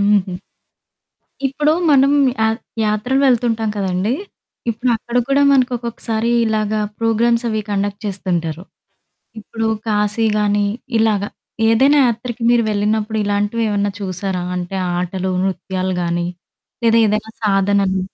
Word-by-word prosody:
హుహు. 200 Hz, -2 st, +2 dB, 1.2 s
ఇప్పుడు 295 Hz, +3 st, +1 dB, 0.2 s
మనం 275 Hz, -1 st, +5 dB, 0.3 s
యా 220 Hz, -, +4 dB, 0.4 s
యాత్రలు 245 Hz, +6 st, +1 dB
వెళ్తుంటాం 230 Hz, -3 st, +1 dB
కదండీ, 190 Hz, +1 st, -1 dB, 0.6 s
ఇప్పుడక్కడ 235 Hz, +1 st, -1 dB
కూడా 275 Hz, +1 st, +3 dB
మనకు 255 Hz, -2 st, +3 dB
ఒక్కొక్కసారి 230 Hz, -1 st, -2 dB
ఇలాగ 215 Hz, -1 st, 0 dB, 0.3 s
ప్రోగ్రామ్స్ 230 Hz, +1 st, +2 dB
అవి 215 Hz, 0 st, -1 dB
కండక్ట్ 200 Hz, 0 st, -2 dB
చేస్తుంటారు. 175 Hz, -4 st, -2 dB, 0.8 s
ఇప్పుడు 225 Hz, +1 st, -4 dB, 0.2 s
కాశీ 210 Hz, +1 st, +1 dB
గాని 205 Hz, 0 st, +2 dB, 0.3 s
ఇలాగ 220 Hz, -3 st, +2 dB, 0.5 s
ఏదైనా 270 Hz, +6 st, +4 dB
యాత్రకి 235 Hz, 0 st, -3 dB
మీరు 240 Hz, -1 st, +4 dB
వెళ్ళినప్పుడు 215 Hz, +1 st, 0 dB
ఇలాంటివేవన్నా 205 Hz, 0 st, 0 dB
చూసారా 185 Hz, -1 st, -3 dB
అంటే 180 Hz, +2 st, -4 dB, 0.2 s
ఆటలు, 185 Hz, +1 st, -2 dB
నృత్యాలు 185 Hz, 0 st, -2 dB
గాని 170 Hz, 0 st, -1 dB, 0.6 s
లేదా 230 Hz, 0 st, +5 dB
ఏదైనా 215 Hz, +1 st, -1 dB
సాధనలు? 195 Hz, -1 st, +2 dB
210 Hz, 110 wpm, -18 LUFS, 195-230 Hz, 1.2 s, మనం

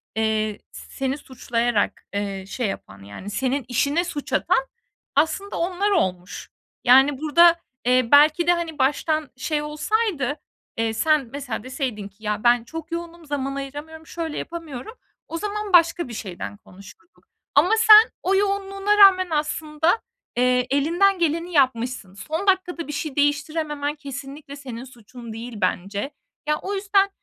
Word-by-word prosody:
eee, 220 Hz, -1 st, 0 dB
s -, -, -11 dB
seni 270 Hz, +1 st, -1 dB
suçlayarak, 240 Hz, -4 st, -1 dB
eee, 200 Hz, -1 st, -3 dB
şey 235 Hz, +2 st, -2 dB
yapan, 100 Hz, -, -7 dB
yani, 100 Hz, -, -9 dB
senin 260 Hz, +4 st, -1 dB
işine 280 Hz, +7 st, +1 dB
suç 315 Hz, -5 st, -6 dB
atan, -, -, +2 dB, 0.5 s
aslında, 320 Hz, +7 st, 0 dB
onlar 370 Hz, +4 st, 0 dB
olmuş. 185 Hz, -, -1 dB, 0.3 s
Yani, 265 Hz, +3 st, +6 dB
burada, 335 Hz, +3 st, +6 dB, 0.3 s
eee, 250 Hz, -1 st, +3 dB
belki 305 Hz, +4 st, +6 dB
de, 350 Hz, -, +6 dB
hani, 335 Hz, -3 st, -4 dB
baştan 300 Hz, +3 st, +1 dB
şey 295 Hz, +3 st, -1 dB
olsaydı, 300 Hz, -, -1 dB, 0.4 s
eee, 225 Hz, 0 st, 0 dB
sen 300 Hz, 0 st, +2 dB
mesela 255 Hz, -7 st, -5 dB
deseydin 255 Hz, -6 st, -4 dB
ki 200 Hz, +2 st, -22 dB
"Ya, 210 Hz, +1 st, -2 dB
ben 240 Hz, -1 st, +4 dB
çok 325 Hz, +6 st, -8 dB
yoğunum, 340 Hz, 0 st, -6 dB
zaman 275 Hz, -2 st, -3 dB
ayıramıyorum, 295 Hz, +4 st, -7 dB
şöyle 325 Hz, -3 st, -5 dB
yapamıyorum.", 330 Hz, -, -7 dB, 0.4 s
zaman 415 Hz, +3 st, -4 dB
başka 335 Hz, -2 st, +4 dB
bir 235 Hz, -, -8 dB
şeyden 200 Hz, -1 st, -6 dB
konuşurduk 200 Hz, -, -17 dB, 0.3 s
ama 310 Hz, +7 st, +5 dB
sen 440 Hz, 0 st, +8 dB
o 385 Hz, +2 st, +2 dB
yoğunluğuna 395 Hz, +1 st, 0 dB
rağmen 380 Hz, -2 st, +7 dB
aslında, 305 Hz, +4 st, 0 dB, 0.4 s
eee, 250 Hz, 0 st, +2 dB
elinden 345 Hz, +8 st, +2 dB
geleni 335 Hz, +2 st, 0 dB
yapmışsın. 250 Hz, -, +1 dB
Son 320 Hz, -, -4 dB
dakikada 360 Hz, -4 st, +1 dB
bir 295 Hz, -, -5 dB
şey 290 Hz, -1 st, -4 dB
değiştirememen 290 Hz, 0 st, 0 dB
kesinlikle 280 Hz, 0 st, -8 dB
senin 255 Hz, -4 st, -8 dB
suçun 240 Hz, -2 st, -11 dB
değil 235 Hz, +2 st, -7 dB
bence. 200 Hz, +9 st, -1 dB, 0.4 s
Ya, 300 Hz, -, +1 dB
o 400 Hz, -, -4 dB
yüzden 395 Hz, 0 st, +2 dB
290 Hz, 145 wpm, -23 LUFS, 245-340 Hz, 0.5 s, sen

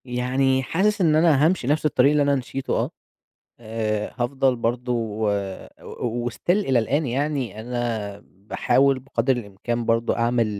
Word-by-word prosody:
يعني 130 Hz, +2 st, +1 dB
حاسس 195 Hz, +8 st, +1 dB
إن 160 Hz, -4 st, +4 dB
أنا 155 Hz, -3 st, +4 dB
هامشي 165 Hz, -7 st, +1 dB
نفس 150 Hz, +2 st, +1 dB
الطريق 140 Hz, -1 st, +4 dB
اللي 150 Hz, -1 st, +3 dB
أنا 140 Hz, 0 st, +2 dB
مشيته 135 Hz, +1 st, -3 dB
آه، -, -, -1 dB, 0.7 s
آآ، 110 Hz, -2 st, -3 dB
هافضل 130 Hz, +1 st, +1 dB
برضه 120 Hz, +1 st, -2 dB
و 110 Hz, -2 st, -1 dB, 0.5 s
و 120 Hz, 0 st, -3 dB
وstill 120 Hz, -, -13 dB
إلى 175 Hz, -, +3 dB
الآن 140 Hz, +7 st, 0 dB
يعني، 130 Hz, -4 st, -2 dB
أنا 115 Hz, -4 st, -3 dB
باحاول 130 Hz, +7 st, +1 dB
بقدر 130 Hz, 0 st, 0 dB
الإمكان 115 Hz, +2 st, -4 dB
برضه 115 Hz, +1 st, +1 dB
أعمل 115 Hz, 0 st, +2 dB
125 Hz, 145 wpm, -23 LUFS, 115-140 Hz, 0.7 s, إن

